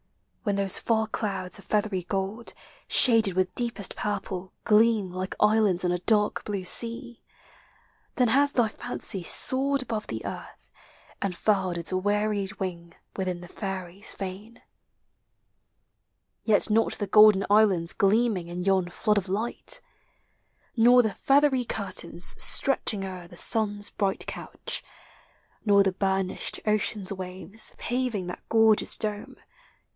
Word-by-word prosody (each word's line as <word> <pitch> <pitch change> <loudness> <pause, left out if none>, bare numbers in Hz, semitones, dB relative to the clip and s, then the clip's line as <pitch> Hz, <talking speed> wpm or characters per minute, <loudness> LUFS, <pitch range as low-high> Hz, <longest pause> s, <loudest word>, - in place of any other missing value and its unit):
When 205 -4 -1
those 195 -1 +3
far 220 -1 +1
clouds 200 -4 -3
of - - -14
feathery 210 -3 0
gold,. 195 +5 -4 0.3
Shaded 225 -7 +4
with 185 -1 0
deepest 230 -5 -1
purple, 195 -3 -4
gleam 215 -3 +3
Like 185 +1 -5
islands 210 -4 +3
on 175 - +1
a 180 - -1
dark 210 +2 +1
blue 205 -2 -3
1 - - -11
sea; 235 +4 -2 0.9
Then 250 -2 +2
has 280 +4 +3
thy 240 -5 +2
fancy 215 -3 -4
soared 270 +9 0
above 220 -4 -4
llie 110 0 -6
earth, - - -9 0.5
And 195 -3 -2
furled 190 -4 +1
its 170 +1 -6
wearied 205 +1 0
wing 170 -3 -5 0.2
Within 185 -2 -3
the 175 - -10
Fairy's 190 0 -6
fane. 200 +4 -8 1.8
Yet 215 -1 +2
not 225 +1 +2
the 205 - -3
golden 210 -1 +6
islands 200 -5 +3
Gleaming 200 -3 +1
in 175 +1 -5
yon 190 -2 +1
flood 210 +3 +1
of 190 -1 -9
light, 215 +5 -1 0.9
Nor 245 +1 +6
the 220 -3 -1
feathery 275 -2 +3
curtains 185 -6 -2
Stretching 215 -7 +1
o'er 185 -2 -8
the 175 - -15
sun's 205 -1 -1
bright 195 -2 -1
couch, - - -4 0.8
Nor 200 -2 +5
the 190 -1 0
burnished 190 -1 -1
ocean's 210 -2 0
waves 190 +3 -7
Paving 245 -6 -2
that 180 - -7
gorgeous 220 -1 +5
dome. 210 -1 -4
205 Hz, 135 wpm, -26 LUFS, 185-220 Hz, 1.8 s, golden